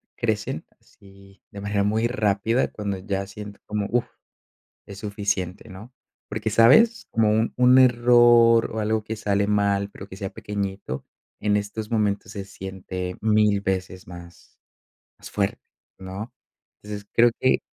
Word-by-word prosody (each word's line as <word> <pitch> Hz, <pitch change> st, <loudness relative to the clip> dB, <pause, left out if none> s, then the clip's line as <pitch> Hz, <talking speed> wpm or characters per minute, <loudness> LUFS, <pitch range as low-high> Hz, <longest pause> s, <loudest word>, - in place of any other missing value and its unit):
crecen 110 Hz, -8 st, -2 dB, 0.2 s
así 100 Hz, 0 st, -20 dB
de 100 Hz, -, -9 dB
manera 100 Hz, 0 st, -1 dB
muy 110 Hz, +3 st, +1 dB
rápida 110 Hz, 0 st, 0 dB
cuando 100 Hz, -2 st, -4 dB
ya 95 Hz, 0 st, -3 dB
siento 100 Hz, 0 st, -10 dB
como, 105 Hz, -1 st, -2 dB
uf, 120 Hz, -1 st, +1 dB, 0.8 s
es 100 Hz, 0 st, -10 dB
suficiente, 100 Hz, -3 st, -3 dB
¿no?, 105 Hz, +7 st, -11 dB, 0.4 s
porque, -, -, -2 dB
¿sabes? 215 Hz, -, +5 dB
Como 110 Hz, -1 st, +2 dB
un 110 Hz, +2 st, +1 dB
un 125 Hz, +1 st, +6 dB
error 120 Hz, -2 st, +5 dB
o 110 Hz, -, -3 dB
algo 110 Hz, 0 st, 0 dB
que 110 Hz, +1 st, -5 dB
sale 100 Hz, -2 st, 0 dB
mal, 100 Hz, -1 st, +1 dB
pero 95 Hz, -, -10 dB
que 95 Hz, -, -11 dB
sea 95 Hz, -1 st, -4 dB
pequeñito, 100 Hz, -9 st, -5 dB, 0.3 s
en 105 Hz, -1 st, +1 dB
estos 105 Hz, +1 st, -5 dB
momentos 105 Hz, -3 st, 0 dB
se 100 Hz, -2 st, -5 dB
siente 95 Hz, -2 st, -6 dB
1000 105 Hz, -2 st, +3 dB
veces 95 Hz, -2 st, -3 dB
más 85 Hz, -1 st, -13 dB, 0.6 s
más -, -, -10 dB
fuerte, 100 Hz, -2 st, -2 dB, 0.4 s
¿no?, 95 Hz, +5 st, -7 dB, 0.5 s
entonces 105 Hz, -1 st, -8 dB
creo 120 Hz, +1 st, +5 dB
que 130 Hz, -, +3 dB
105 Hz, 145 wpm, -24 LUFS, 100-110 Hz, 0.8 s, un